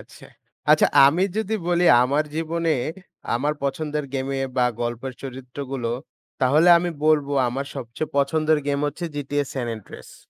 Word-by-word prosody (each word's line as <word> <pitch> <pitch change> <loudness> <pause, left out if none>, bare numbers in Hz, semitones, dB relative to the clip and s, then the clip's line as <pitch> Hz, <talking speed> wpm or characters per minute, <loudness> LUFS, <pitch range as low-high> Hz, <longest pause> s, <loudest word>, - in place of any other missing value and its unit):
আচ্ছা। - - -15 0.5
আচ্ছা - - +6 0.2
আমি 160 +6 +3
যদি 220 0 -1
বলি 175 0 +2 0.2
আমার 140 +4 +1
জীবনের 160 -3 -1 0.4
আমার 145 +5 0
পছন্দের 150 +1 -2
গেমে 135 0 -2 0.2
বা 125 - +3 0.2
গল্পের 120 +2 -3
চরিত্রগুলো 130 -1 -5 0.5
তাহলে 150 +7 +4
আমি 175 0 -2
বলবো 150 -2 +3 0.2
আমার 135 +3 -3
সবচেয়ে 135 +4 -5
পছন্দের 155 +2 +2
গেম 140 0 0
হচ্ছে 170 +4 -4
GTA: 145 0 -1
San 130 -3 -3
Andreas। 105 - -13
140 Hz, 140 wpm, -23 LUFS, 130-155 Hz, 0.5 s, আচ্ছা